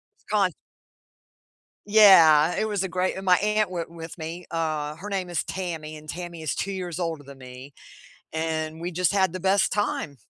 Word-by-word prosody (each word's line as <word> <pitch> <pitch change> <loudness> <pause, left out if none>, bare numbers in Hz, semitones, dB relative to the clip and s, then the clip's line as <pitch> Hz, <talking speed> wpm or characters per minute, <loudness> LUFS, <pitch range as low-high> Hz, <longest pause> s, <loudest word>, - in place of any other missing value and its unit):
S - - -34
con - - +3 1.4
Yeah, 175 -7 +7
it 220 - 0
was 205 -2 -1
a - - -2
great, 185 +2 -1
and 190 - -6
my 180 -1 +5
aunt 210 -1 +1
went 170 -2 -4
with 165 0 -9
me, 165 +2 -6
uh, 155 -2 -2
her 205 - -8
name 190 -3 -3
is 170 - -1
Tammy 160 -5 -5
and 155 0 -13
Tammy 170 -1 -7
is 155 - -2
2 195 - -3
years 180 -3 -5
older 165 -4 -3
than 140 -1 -12
me, 130 +2 -11 0.6
and 160 0 -3
we 175 +2 -4
just 180 +3 +1
had 190 -3 +2
the 185 - -4
best 190 +2 +2
time. 160 -8 -2
170 Hz, 190 wpm, -25 LUFS, 155-190 Hz, 1.4 s, Yeah